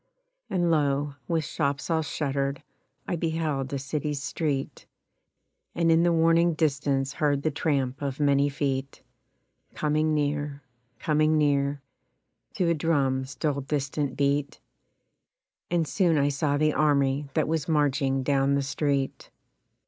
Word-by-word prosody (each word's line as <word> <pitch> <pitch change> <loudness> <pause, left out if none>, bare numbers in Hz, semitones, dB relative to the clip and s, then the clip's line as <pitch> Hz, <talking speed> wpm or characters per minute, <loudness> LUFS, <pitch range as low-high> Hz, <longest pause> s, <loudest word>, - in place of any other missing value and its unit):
And, 175 -2 +1
lo! 145 -2 +1
with 160 -2 0
shops 145 +1 -2
all 160 -1 +2
shuttered 140 -2 -2 0.4
I - - -1
beheld 160 -5 -2
a 140 - -1
city's 145 +1 -3
street, 145 -2 -3 0.9
And 165 -1 +2
in 165 0 +5
the 175 0 +3
warning 165 0 +3
distance 140 -3 0
heard 145 -2 0
the 155 - +1
tramp 140 -4 -1
of 140 -1 -3
many 140 -1 +3
feet, 135 -1 -3 0.7
Coming 155 +1 +1
near, 145 -1 -2 0.3
coming 155 +2 +2
near, 140 -1 +1 0.7
To 180 - +1
a - - +4
drum's 140 -4 0
dull 145 -3 -1
distant 140 0 -2
beat, 140 0 0 1.1
And 170 -3 +1
soon 165 +4 +2
I 140 0 +3
saw 145 0 0
the 155 0 +2
army 140 -1 +1
that - - +2
was 160 0 -1
marching 140 -3 +1
down 140 0 +2
the 140 - 0
street. 140 0 -2
145 Hz, 135 wpm, -26 LUFS, 140-155 Hz, 1.1 s, in